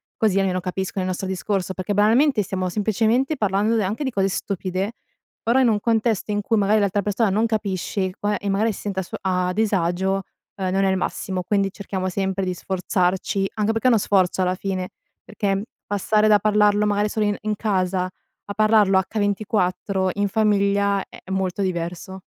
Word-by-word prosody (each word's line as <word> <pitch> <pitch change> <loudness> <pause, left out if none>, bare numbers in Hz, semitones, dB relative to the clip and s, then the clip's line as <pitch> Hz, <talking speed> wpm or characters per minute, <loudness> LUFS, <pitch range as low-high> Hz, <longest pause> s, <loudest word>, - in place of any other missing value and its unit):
così 205 -3 +2
almeno 185 -2 0
capiscono 190 +1 -3
il 185 - -2
nostro 190 +1 -4
discorso" 190 0 -2
perché, 185 +2 -3
banalmente, 225 +5 +4
stiamo 185 0 -2
semplicemente 225 - +1
parlando 210 -1 +1
de 220 - +2
anche 215 +9 -2
di - - 0
cose 195 -2 +1
stupide, 190 +2 -3 0.5
però 235 +3 +3
in 255 - +4
un 210 -2 +1
contesto 225 -2 +1
in 205 - 0
cui 225 +2 0
magari 210 +1 +3
l'altra 200 0 +1
persona 205 +2 +1
non 210 +4 +2
capisce 200 -3 -1
e 185 - -4
qua 205 0 -1
e 205 - -6
magari 205 +3 +1
si 200 - -8
senta 195 -2 -2
a - - -5
suo - - -7
a 180 -1 0
disagio, 190 -2 0 0.3
ehm, 190 -2 -2
non 195 +1 +2
è - - +3
il 190 - +2
massimo, 185 0 -3
quindi 195 +1 0
cerchiamo 190 -2 -4
sempre 190 +1 -1
di 185 - -1
sforzarci, 185 +1 -1
anche 215 0 +1
perché 225 +3 +1
è - - +7
uno 230 -4 +4
sforzo, 190 -2 +2
alla 185 0 +1
fine, 185 -1 -3 0.3
perché, 200 -2 -1
mhmm, 195 - -2 0.3
passare 210 +1 +2
da 210 -1 +6
parlarlo 210 0 +3
magari 205 0 +1
solo 215 0 0
in 205 -1 0
in 210 0 -1
casa 190 -3 0 0.4
a 200 - -5
parlarlo 215 -3 +4
h24 200 -2 0
in 205 0 +1
famiglia 200 -1 +2
è - - -13
molto 190 0 -1
diverso. 180 +1 -4
200 Hz, 195 wpm, -22 LUFS, 190-210 Hz, 0.5 s, è